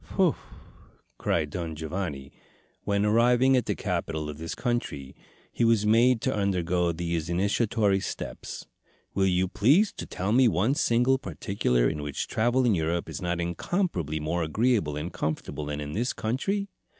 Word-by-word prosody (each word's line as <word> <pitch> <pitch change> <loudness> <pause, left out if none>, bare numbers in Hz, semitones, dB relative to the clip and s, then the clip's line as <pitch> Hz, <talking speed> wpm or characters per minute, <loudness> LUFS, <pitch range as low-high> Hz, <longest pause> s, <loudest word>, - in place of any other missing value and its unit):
"Whew!" - - +3 0.8
cried 75 -4 0
Don 85 -2 -4
Giovanni 75 -4 -4 0.5
when, 100 0 +1
arriving 120 +4 +4
at 125 -3 +1
the - - 0
capital 80 -5 -3
of 75 - -11
this 80 +1 -5
country, 75 - -3 0.4
he - - -1
was 115 -2 +3
made 115 +2 +4
to - - 0
undergo 90 -3 +1
these 85 -1 -3
initiatory 100 +2 +1
steps, - - -6 0.5
"will 95 0 +2
you 90 0 +2
please 145 - +3
to - - -7
tell 95 +3 -2
me 125 +2 +5
one 105 +6 +2
single 125 0 +2
particular 60 - 0
in 75 -2 -2
which 75 -1 -3
travel 120 +3 +1
in 115 - +4
Europe 85 0 -1
is - - -6
not 90 -1 -1
incomparably 85 - -1
more 80 +3 -1
agreeable 85 - +1
and 80 +4 -5
comfortable 75 -1 -3
than 75 0 -3
in 75 0 -5
this 120 +4 -1
country?" 195 - -1
95 Hz, 160 wpm, -27 LUFS, 80-115 Hz, 0.8 s, me